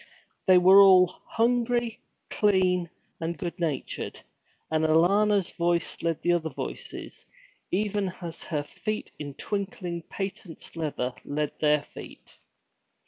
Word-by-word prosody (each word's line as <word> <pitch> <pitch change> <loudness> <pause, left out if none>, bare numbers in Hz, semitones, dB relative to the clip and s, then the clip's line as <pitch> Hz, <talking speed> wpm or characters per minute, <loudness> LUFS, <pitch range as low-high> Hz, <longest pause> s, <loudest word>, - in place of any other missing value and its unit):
They 185 -1 +7
were 190 +2 +8
all 190 -2 +8 0.2
hungry, 235 0 +1 0.3
clean, 185 -4 +2 0.3
and 165 +1 -3
good 175 -1 -5
natured, 160 -5 -3 0.5
and 160 0 +1
Alanna's 190 +5 +3
voice 170 -1 -1
led 165 -2 -1
the 175 - +3
other 165 -2 0
voices, 135 - -7 0.4
even 205 0 0
as 170 -3 -7
her 150 -3 -2
feet, 215 +8 -5
in 145 -2 -6
twinkling 190 -4 -4
patent 195 -4 -7
leather, 145 -6 -2
led 150 0 -2
their 150 -1 +3
feet. - - -13
175 Hz, 120 wpm, -27 LUFS, 160-200 Hz, 0.5 s, were